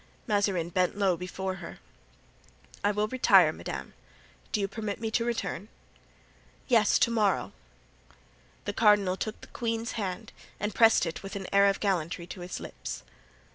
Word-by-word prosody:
Mazarin 200 -6 +1
bent 180 +2 +1
low 195 -3 +3
before 185 +2 -4
her. - - -9 1.1
"I 205 - +4
will 210 +1 +1
retire, 195 -9 +5
madame. 65 - -6 0.6
Do - - 0
you 200 - 0
permit 205 0 -4
me 225 -1 -3
to 230 - +1
return?" 235 -3 -3 1.0
"Yes, 225 -5 +4
to 235 - +3
morrow." 215 -4 +1 1.1
The 205 - -2
cardinal 205 -4 +4
took 215 +3 -4
the - - -10
queen's 230 -1 -2
hand 190 -5 -4 0.3
and 210 0 -2
pressed 225 -5 +5
it 165 - -4
with 195 0 -7
an 195 -1 -4
air 200 0 +6
of 195 - +1
gallantry 175 -4 -1
to 180 +2 -9
his 180 +1 -5
lips. - - -7
200 Hz, 155 wpm, -29 LUFS, 185-220 Hz, 1.1 s, air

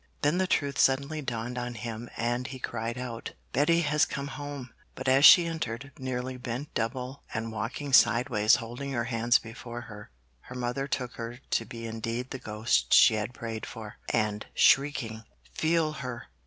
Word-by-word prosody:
Then 150 +5 +3
the 190 - +2
truth 140 -5 0
suddenly 140 +3 +2
dawned 120 -2 -3
on 120 0 -4
him 115 +1 -6
and 120 +2 -1
he 130 - -7
cried 115 -1 -4
out, 120 -2 -6 0.2
'Betty 165 +5 +3
has 150 -1 +2
come 140 0 -2
home'; 140 -2 -7 0.2
but 130 - -6
as 135 +2 +5
she 175 -3 +10
entered, 140 -5 -4
nearly 130 0 -3
bent 125 +4 -5
double 125 +4 -3
and 115 0 -2
walking 120 +6 -4
sideways 115 -3 +5
holding 120 +4 -5
her 120 -2 0
hands 115 0 +3
before 120 +1 -8
her, 105 -4 -11 0.3
her 125 - -11
mother 125 +2 -2
took 125 -3 -3
her 115 +1 -5
to - - +1
be 115 -1 -8
indeed 115 +3 -4
the 135 - -4
ghost 105 - +1
she - - +8
had 105 +2 -2
prayed 115 -2 -5
for, 110 -3 -9
and, 105 -2 0
shrieking 125 -6 +3 0.3
'Feel 160 - +1
her! 125 -5 -6
125 Hz, 170 wpm, -28 LUFS, 115-140 Hz, 0.3 s, she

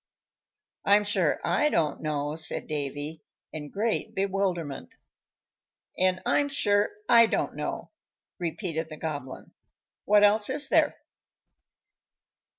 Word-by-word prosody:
"I'm 205 +1 +4
sure 195 -7 +1
I 300 - +2
don't 155 - 0
know," 150 -1 -2
said 160 - +1
Davy, 145 +1 -5 0.3
in 150 -2 -6
great 215 +5 -2
bewilderment. 185 - -2 1.0
"And 185 0 +1
I'm 285 -1 +2
sure 205 -7 +2 0.2
I 230 -1 +7
don't - - -1
know," - - -5 0.5
repeated 165 -2 -3
the 155 - -8
Goblin. 145 -5 -6 0.5
"What 210 0 +5
else 210 +2 +4
is 285 +3 0
there?" - - +3
180 Hz, 110 wpm, -27 LUFS, 155-205 Hz, 1.0 s, I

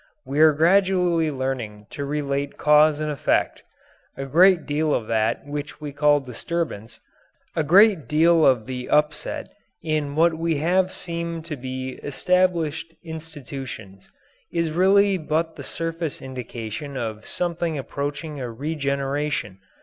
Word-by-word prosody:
We 140 +2 -2
are 155 0 +8
gradually 175 0 +3
learning 130 -7 -4
to 145 - -5
relate 140 -1 -2
cause 150 0 +5
and 155 0 -1
effect. 145 - 0 0.6
A 135 - -4
great 170 +4 +5
deal 150 +1 +1
of 115 - -2
that 110 +3 0
which 145 -1 -6
we 150 -1 -6
call 145 +1 +3
disturbance 130 -3 -4 0.6
a 160 - +1
great 190 +1 +5
deal 165 +2 +4
of 125 -6 +4
the 125 -1 -5
upset 150 0 0 0.3
in 150 -3 -1
what 165 +2 +4 0.3
have 180 +5 +2
seemed 170 -2 -4
to 165 -3 -4
be 130 0 -6
established 165 0 0
institutions 135 - -8 0.4
is 170 -2 0
really 195 +3 +4
but 160 +1 -1
the - - -8
surface 165 -2 -4
indication 130 +1 -6
of 110 -3 -5
something 170 -2 -2
approaching 145 +2 -4
a 125 -2 -4
regeneration. 140 -4 -2
150 Hz, 130 wpm, -23 LUFS, 135-165 Hz, 0.6 s, are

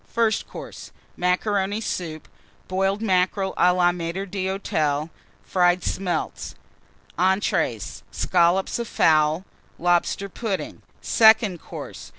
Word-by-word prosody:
FIRST 225 -2 0
COURSE. - - -9 0.2
Macaroni 195 +3 0
Soup. 165 -7 -4 0.4
Boiled 195 +3 0
Mackerel 190 -1 +1
à 180 - +4
la 175 -1 +4
Maitre 175 +2 -4
d'Hôtel. 180 -6 -1 0.3
Fried 180 -1 +2
Smelts. 185 -2 -3 0.6
ENTREES. 190 +2 0
Scollops 180 +4 +1
of 235 - -3
Fowl. 155 +1 +3 0.3
Lobster 175 +3 +1
Pudding. 200 0 -4 0.2
SECOND 220 -5 +4
COURSE. - - -9
185 Hz, 100 wpm, -23 LUFS, 175-200 Hz, 0.6 s, à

